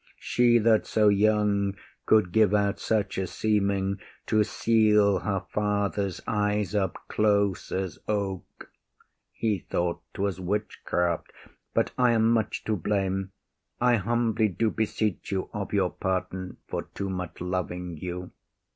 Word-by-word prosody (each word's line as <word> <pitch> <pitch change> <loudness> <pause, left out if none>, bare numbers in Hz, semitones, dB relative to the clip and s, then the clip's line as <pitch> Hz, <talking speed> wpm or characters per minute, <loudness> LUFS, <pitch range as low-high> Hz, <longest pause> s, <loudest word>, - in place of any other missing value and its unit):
She 120 -1 +3
that 110 -1 +3
so 105 -1 +4
young 100 -1 +2 0.3
could 105 -5 +4
give 105 0 +4
out 100 -1 +1
such 105 -4 0
a 95 - -1
seeming, 100 0 0 0.3
To 110 -1 +3
seal 105 -3 +3
her 100 -1 -2
father’s 100 -2 -1
eyes 105 -2 0
up 95 -4 0
close 100 -3 +1
as 95 -4 -3
oak, 100 -3 -4 0.6
He 110 -4 -1
thought 85 0 -2
’twas 100 -2 -1
witchcraft. 90 -3 -1 0.4
But - - +2
I 125 -1 +5
am 115 0 +3
much 115 -2 0
to 110 - 0
blame. 95 0 -1 0.5
I 125 -1 +4
humbly 115 +1 +1
do 110 +3 0
beseech 110 -2 -2
you 95 -1 -2
of 105 -2 -4
your 95 -3 +1
pardon 95 0 -3
For - - -4
too 100 -1 -3
much 90 -2 -5
loving 90 -1 -3
you. 90 +2 -6
100 Hz, 135 wpm, -27 LUFS, 95-110 Hz, 0.6 s, I